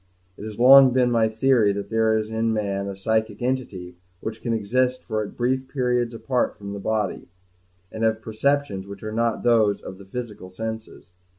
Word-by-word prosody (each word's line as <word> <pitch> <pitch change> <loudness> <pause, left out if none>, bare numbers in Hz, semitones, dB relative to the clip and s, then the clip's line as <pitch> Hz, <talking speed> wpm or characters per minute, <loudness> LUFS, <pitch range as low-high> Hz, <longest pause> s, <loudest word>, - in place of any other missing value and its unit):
It 105 - -9
has 110 -1 -7
long 135 +2 +9
been 125 -1 +2
my 115 -2 +3
theory 110 -1 +3
that 100 +2 -6
there 110 0 +2
is 110 0 -3
in 110 0 0
man 100 -2 -2
a 100 - -5
psychic 110 +2 -1
entity 100 -9 -3 0.2
which 110 +2 -6
can 120 - -2
exist 125 +4 0
for 110 0 -2
at 105 - -3
least - - -15
brief 130 +2 0
periods 125 -3 -1
apart 125 0 -1
from 100 -1 -7
the 100 - -6
body, 105 -1 -2 0.6
and 110 - -4
have 110 0 +2
perceptions 110 -3 -1
which 100 0 -10
are 110 - -4
not 115 0 0
those 110 -4 +3
of 95 - -10
the 100 - -12
physical 105 -3 -7
senses. 110 0 -7
110 Hz, 195 wpm, -23 LUFS, 100-120 Hz, 0.6 s, long